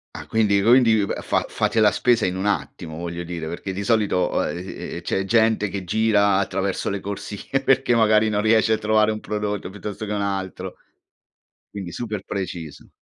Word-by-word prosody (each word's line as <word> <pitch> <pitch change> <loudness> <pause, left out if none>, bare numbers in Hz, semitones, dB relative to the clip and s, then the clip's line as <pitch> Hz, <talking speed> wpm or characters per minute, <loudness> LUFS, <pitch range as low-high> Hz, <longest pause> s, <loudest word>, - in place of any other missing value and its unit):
Ah, - - -7
quindi 105 -3 +2
quindi 115 -3 +5 0.2
fa - - 0
fate 115 - 0
la 105 -1 +5
spesa 120 -4 +2
in 90 0 -1
un 95 +2 -2
attimo 85 -5 -3
voglio 85 0 -5
dire, 85 -2 -5
perché 90 +3 -5
di 100 +2 -4
solito, 100 -4 +1
uhm, 90 +2 -4
c'è 95 - -1
gente 110 0 +2
che 95 -1 -5
gira 100 0 +3
attraverso 95 0 -1
le 100 0 -2
corsie 100 +6 -4
perché 135 -2 +3
magari 110 -1 +4
non 105 0 0
riesce 110 0 +3
a - - 0
trovare 110 0 +3
un 110 - -4
prodotto 105 -3 -3
piuttosto 105 +2 -6
che - - -4
un 100 - -1
altro. 95 -2 -4 0.9
Quindi 95 -4 -7
super 105 -2 -4
preciso. 90 -6 -6
100 Hz, 175 wpm, -23 LUFS, 95-110 Hz, 0.9 s, quindi